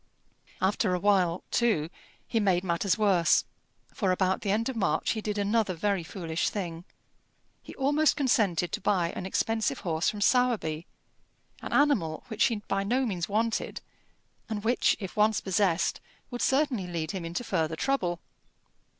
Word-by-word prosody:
After 190 0 +2
a - - -2
while, 185 -3 +2
too, 195 -10 +1 0.4
he 230 - 0
made 190 -4 +2
matters 180 +3 0
worse, 190 -6 +3 0.5
for 195 -4 0
about 185 0 +1
the 200 - -3
end 220 +3 +1
of 265 - -3
March 190 -8 0
he 220 - -2
did 210 -1 -3
another 205 -1 +1
very 200 +2 0
foolish 165 -1 -2
thing. 175 -4 -5 0.8
He - - -11
almost 290 +3 +2
consented 200 - +1
to - - -3
buy 185 -4 +1
an 185 - -5
expensive 225 +3 -1
horse 165 -3 0
from 210 - -5
Sowerby 205 -9 +1 0.7
an - - -6
animal 230 - +2
which 220 - +2
he 230 - +1
by 195 0 0
no 250 +6 +1
means 180 -7 -3
wanted, 225 +2 -1 0.7
and 210 -2 -3
which, 240 +3 +2
if 190 -4 -7
once 215 0 +3
possessed, 190 -2 0 0.3
would 245 - -4
certainly 265 -9 +1
lead 165 -2 -3
him 190 -3 -5
into 170 +8 -4
further 160 -7 -1
trouble. 175 - -1
200 Hz, 160 wpm, -28 LUFS, 175-225 Hz, 0.8 s, worse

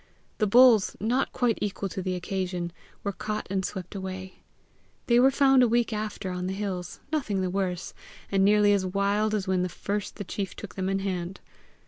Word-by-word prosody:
The 215 - +3
bulls, 235 -1 +6
not 240 +6 0
quite 240 -3 +1
equal 200 -1 -2
to 190 - -4
the 185 0 -2
occasion, 180 -1 -3 0.3
were 200 - -1
caught 215 +2 -4
and 190 -1 0
swept 185 -1 -5
away. 190 -1 -6 0.7
They 235 0 +4
were 260 +2 +7
found 270 -1 +5
a 245 - +6
week 235 0 +1
after 210 -3 -3
on 180 0 -3
the 190 - -2
hills, 185 -3 -4
nothing 220 -11 0
the 185 -1 -1
worse, 185 -2 -2 0.4
and 195 -1 +3
nearly 205 0 +5
as 200 -2 +2
wild 200 +3 +1
as 200 -2 -2
when 185 -1 +1
first 200 +3 -4
the - - -5
chief 195 0 -4
took - - -8
them 190 -1 -2
in 195 - +1
hand. 180 -1 -3
195 Hz, 190 wpm, -27 LUFS, 185-215 Hz, 0.7 s, were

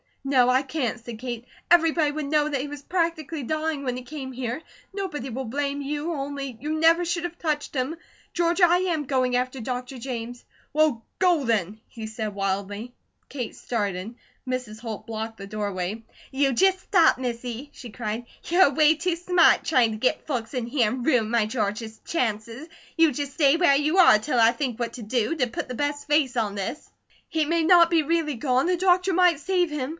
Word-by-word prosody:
"No, 260 -3 +3
I 255 +1 +4
can't," 260 -4 -3
said 235 -2 -7
Kate. 240 -1 -5 0.3
"Everybody 325 -3 +4
would 300 0 -4
know 300 +1 +2
that 280 -3 -1
he 285 - -4
was 290 -1 -8
practically 330 -3 -2
dying 310 +1 -2
when 250 -2 -2
he 255 - -7
came 265 0 -7
here. 250 +2 -4 0.3
Nobody 355 -10 -4
will 260 +3 -4
blame 280 +4 -2
you, 295 +4 -3
only, 275 -3 -5
you 310 +2 -2
never 330 +2 +5
should 340 0 -1
have 350 0 -5
touched 300 -3 -2
him! 265 +5 -1 0.4
George, 345 +2 +1
I 350 0 +6
AM 340 -5 -1
going 255 -2 +1
after 255 +1 -1
Dr. 250 +2 -5
James." 245 -1 -6 0.3
"Well, 300 -7 +2 0.2
go 355 -6 +3
then," 215 -3 -1
he 225 -2 -8
said 220 -1 -4
wildly. 200 +4 -3 0.4
Kate 250 -5 -5
started. 205 -1 -3 0.3
Mrs. 250 -4 -4
Holt 220 -3 -6
blocked 225 0 -5
the 195 - -8
doorway. 205 0 -3 0.3
"You 270 0 +1
just 380 +8 +3
stop, 350 -6 +4
Missy!" 245 +1 -5
she 245 - -10
cried. 225 +1 -4 0.2
"You're 355 +1 +5
away 300 +3 +4
too 335 +2 -1
smart, 350 0 +4
trying 250 -7 +3
to 215 - -4
get 255 +4 0
folks 245 -5 -3
in 245 -3 -2
here, 240 -3 +2
and 250 +1 -4
ruin 240 -8 +2
my 235 -2 +3
George's 220 0 -3
chances. 230 -1 -2 0.3
You 325 -2 +5
just 285 +1 -4
stay 285 -2 +4
where 335 -6 +5
you 300 +5 +1
are 350 - +8
till 250 +2 -1
I 225 0 +6
think 250 -4 -3
what 235 -1 -2
to 245 - -8
do, 230 +5 0
to 255 -6 +1
put 235 - -5
the 250 - -5
best 290 +2 -2
face 295 -4 +2
on 210 -3 0
this!" 205 +10 -5 0.4
"He 320 -1 0
may 335 +2 +1
not 340 0 +6
be 335 -2 +3
really 315 -2 0
gone! 255 +2 +1
The 360 0 +1
doctor 365 +1 +3
might 355 -3 +4
save 355 +2 +1
him!" 280 -3 -3
270 Hz, 200 wpm, -25 LUFS, 235-315 Hz, 0.4 s, are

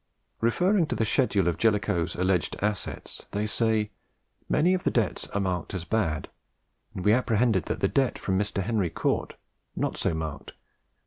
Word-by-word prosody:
Referring 175 - +2
to - - -2
the 110 - +1
schedule 105 - +2
of 85 - 0
Jellicoe's 100 -7 +1
alleged 90 -2 +1
assets, 105 -1 -3
they 105 +1 0
say 110 -1 +1 0.6
"Many 180 +4 +3
of 185 - -1
the - - +3
debts 115 -6 0
are 100 - -2
marked 95 -1 -2
as 90 -2 -4
bad; 90 -7 0 0.7
and 90 - -5
we 105 - +6
apprehend 120 -1 +3
that 95 -6 -1
the - - +4
debt 135 -2 +1
from 95 - -1
Mr. 100 -1 -1
Henry 105 -4 0
Cort, - - -1 0.4
not - - -1
so 80 - 0
marked, 80 -2 -5
of - - -15
54,000L. - - -40
105 Hz, 180 wpm, -27 LUFS, 90-115 Hz, 0.7 s, we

